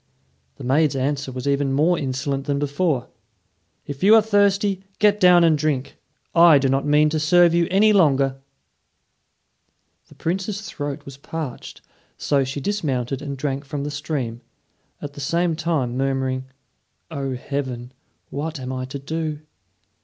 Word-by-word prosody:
The - - -11
maid's 140 +3 +2
answer 140 +1 -2
was 125 +1 -5
even 140 -1 +1
more 155 +6 +3
insolent 135 -1 -3
than 140 -1 0
before. 145 -1 -1 0.8
"If 145 -2 -7
you 205 +4 +7
are 225 - +7
thirsty, 200 -2 +2
get 210 -1 +3
down 180 -2 +6
and 165 -2 +5
drink. 145 -3 -2 0.4
I 170 -3 +7
do 135 -1 +1
not 135 +2 0
mean 150 +1 +4
to 155 - 0
serve 170 +2 +4
you 170 -1 +2
any 210 +3 +4
longer." 135 -7 +2 1.7
The - - -18
Princess's 195 +5 -3
throat 145 -2 -5
was 135 -1 -10
parched, 145 -2 -7 0.4
so 140 -2 +1
she 135 +2 -4
dismounted 135 - -2
and 140 -2 -5
drank 135 0 -3
from 140 0 -5
the 145 - -4
stream, 140 -5 -4 0.6
at 145 -1 -6
the 145 - -9
same 170 +4 0
time 155 -7 -1
murmuring, 130 -1 -1 0.7
"O, 135 -2 -3
Heaven! 125 -2 -5 0.4
what 155 +2 -4
am 130 0 -5
I 130 0 -3
to 135 +2 -6
do?" 155 +1 -4
145 Hz, 155 wpm, -22 LUFS, 135-165 Hz, 1.7 s, you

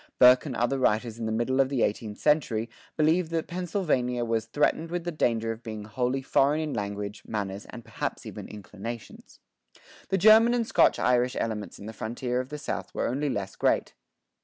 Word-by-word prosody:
Burke 125 +3 +7
and 130 - -4
other 120 +4 0
writers 115 -1 +1
in 115 - -2
the - - -1
middle 120 +4 0
of 135 - +1
the 135 -4 +1
eighteenth 105 0 -2
century 120 -7 +1 0.3
believed 160 +2 +3
that 165 -1 -1
Pennsylvania[23:1] 155 -9 -1
was 115 -1 0
"threatened 150 +5 +1
with 175 0 -3
the 175 - -3
danger 115 -7 0
of 115 0 -7
being 110 -3 -6
wholly 125 +5 -1
foreign 140 +3 +3
in 155 -2 -2
language, 100 0 -4
manners, 100 -2 -4
and 120 -3 -9
perhaps - - -4
even - - -7
inclinations." 105 +3 -9 0.7
The 195 - +2
German 220 +5 +7
and 235 -1 +1
Scotch - - +4
Irish 125 0 +2
elements 110 -2 -3
in 100 - -10
the 110 - -7
frontier 120 +3 -3
of 130 +1 -4
the 150 - -5
South 145 - -5
were - - 0
only 140 +4 -1
less 100 -5 -3
great. - - +1
125 Hz, 190 wpm, -27 LUFS, 110-150 Hz, 0.7 s, Burke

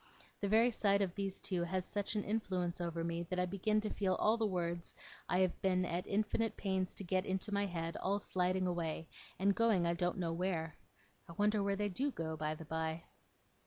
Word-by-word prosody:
The 200 - 0
very 225 +3 +5
sight 200 -2 +3
of 180 -3 -2
these 195 -1 -2
two 180 -3 0
has 185 +2 -1
such 205 +1 -2
an 210 - +1
influence 185 -5 -1
over 170 -1 -2
me, 170 0 -1
that 185 - -1
I 180 - +3
begin 200 +4 +1
to 215 - -2
feel 200 +2 +2
the 225 -2 +1
words 175 -2 -2 0.3
I 180 - +3
have 185 -2 +1
been 185 -1 +2
at 175 +2 -2
infinite 215 +2 0
pains 190 -2 -1
to - - -3
get 185 0 +1
into 190 +2 -1
my 200 0 +2
head, 165 -2 -3
all 200 +2 +1
sliding 185 -1 0
away, 165 -2 -2 0.3
and 200 +1 +3
going 220 -5 +3
I 170 - +2
don't 175 +2 0
know 170 -3 -1
where. 165 -3 -1 0.5
I - - -7
wonder 210 +3 +2
where 200 0 +1
they 205 +1 0
do 265 +10 0
go, 160 - -3
by 155 0 -1
the 160 - -9
by? 160 +1 -2
185 Hz, 210 wpm, -36 LUFS, 170-205 Hz, 0.5 s, very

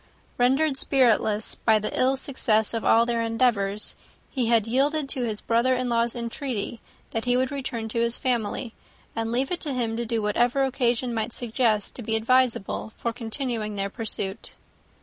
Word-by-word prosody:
Rendered 265 +3 +3
spiritless 225 -6 +3
by 220 -1 +3
the 215 0 -3
ill 265 +1 +2
success 230 -6 0
of 230 - -2
all 230 +1 +5
their 235 -1 0
endeavours, 225 -3 +1 0.4
he 255 -4 0
had 230 -2 +3
yielded 275 +5 +1
to 255 -4 -1
his 215 -2 -3
brother 235 +3 +2
in 250 0 -1
law's 235 0 +1
entreaty 235 -1 -4 0.3
that 225 +1 -2
he 245 0 +3
would 260 +1 0
return 255 -5 -4
to 230 +1 -1
his 235 0 +1
family 235 -1 -1 0.4
and 225 0 -2
leave 260 +5 0
it 360 - +1
to 295 -4 -3
him 230 -3 -1
to 235 - -2
do 230 0 0
whatever 240 +6 +2
occasion 245 -2 0
might 225 +1 -2
suggest 225 -3 0
to - - -8
be 220 0 0
advisable 225 -2 +1
for 235 - -2
continuing 230 -2 -3
their 195 0 -2
pursuit. 205 -4 -4
235 Hz, 175 wpm, -25 LUFS, 225-255 Hz, 0.4 s, all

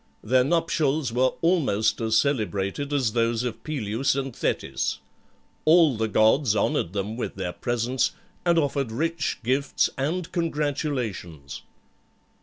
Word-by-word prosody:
Their 125 +3 +3
nuptials 155 -4 0
were 130 +1 +2
almost 140 - +2
as 110 0 +2
celebrated 110 - -1
as 130 -7 +1
those 115 0 +1
of 120 -3 -5
Peleus 130 -3 -1
and 135 -3 -3
Thetis. - - -1 0.7
All 160 -4 +5
the 110 0 0
gods 110 +3 +3
honoured 85 - 0
them 105 +3 -3
with 125 - -4
their 90 -2 -4
presence, 120 +2 0 0.3
and 170 -1 +3
offered 140 -5 0
rich 160 +5 -1
gifts 135 +4 +1
and 165 +6 -2
congratulations. 135 - -3
130 Hz, 125 wpm, -25 LUFS, 110-150 Hz, 0.7 s, All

